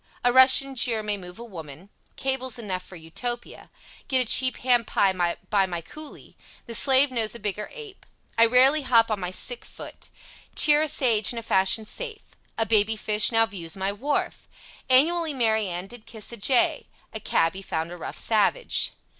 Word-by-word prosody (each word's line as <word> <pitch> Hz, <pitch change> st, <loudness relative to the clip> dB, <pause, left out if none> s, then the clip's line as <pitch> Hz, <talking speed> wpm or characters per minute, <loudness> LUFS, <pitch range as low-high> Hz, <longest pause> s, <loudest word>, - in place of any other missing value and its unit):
A 245 Hz, 0 st, +2 dB
Russian 260 Hz, +1 st, +6 dB
jeer 240 Hz, -4 st, 0 dB
may 210 Hz, -1 st, -2 dB
move 180 Hz, -2 st, -11 dB
a 235 Hz, -, -9 dB
woman. 170 Hz, -3 st, -11 dB, 0.2 s
Cables 260 Hz, -1 st, -3 dB
enough 195 Hz, -6 st, -5 dB
for 185 Hz, -, -13 dB
Utopia. 235 Hz, +9 st, -7 dB, 0.4 s
Get 265 Hz, -, +1 dB
a 255 Hz, -, +2 dB
cheap 255 Hz, +3 st, +2 dB
ham 245 Hz, -1 st, +2 dB
pie 195 Hz, -3 st, +1 dB, 0.4 s
by 200 Hz, -2 st, +3 dB
my 175 Hz, -2 st, -4 dB
cooley. 305 Hz, -, -13 dB, 0.3 s
The 235 Hz, -, -8 dB
slave 265 Hz, +3 st, +4 dB
knows 230 Hz, -2 st, -2 dB
a -, -, -9 dB
bigger 210 Hz, 0 st, -4 dB
ape. 440 Hz, -5 st, -12 dB, 0.3 s
I 230 Hz, 0 st, +5 dB
rarely 260 Hz, +5 st, +4 dB
hop 230 Hz, -4 st, +2 dB
on 210 Hz, -, -2 dB
my 180 Hz, -1 st, -4 dB
sick 240 Hz, +6 st, -2 dB
foot. -, -, -11 dB, 0.5 s
Cheer 295 Hz, 0 st, +6 dB
a 310 Hz, -, +1 dB
sage 230 Hz, -8 st, +1 dB
in 240 Hz, -, -7 dB
a 230 Hz, -, -5 dB
fashion 195 Hz, +1 st, +2 dB
safe. 450 Hz, -, -8 dB, 0.2 s
A 225 Hz, -, 0 dB
baby 220 Hz, 0 st, +2 dB
fish 215 Hz, +1 st, +2 dB
now 225 Hz, 0 st, +3 dB
views 180 Hz, -6 st, -6 dB
my 190 Hz, +1 st, -2 dB
wharf. 275 Hz, +9 st, -3 dB, 0.4 s
Annually 315 Hz, +4 st, +2 dB
Mary 220 Hz, -4 st, +1 dB
Ann 175 Hz, 0 st, -5 dB
did 230 Hz, +2 st, -14 dB
kiss 220 Hz, -1 st, -8 dB
a 235 Hz, -, -8 dB
jay, 240 Hz, +4 st, +1 dB, 0.3 s
A -, -, -5 dB
cabby 165 Hz, +4 st, 0 dB
found 165 Hz, -3 st, -4 dB
a -, -, -7 dB
rough -, -, -8 dB
savage. 225 Hz, -, +1 dB
230 Hz, 185 wpm, -24 LUFS, 195-260 Hz, 0.5 s, Russian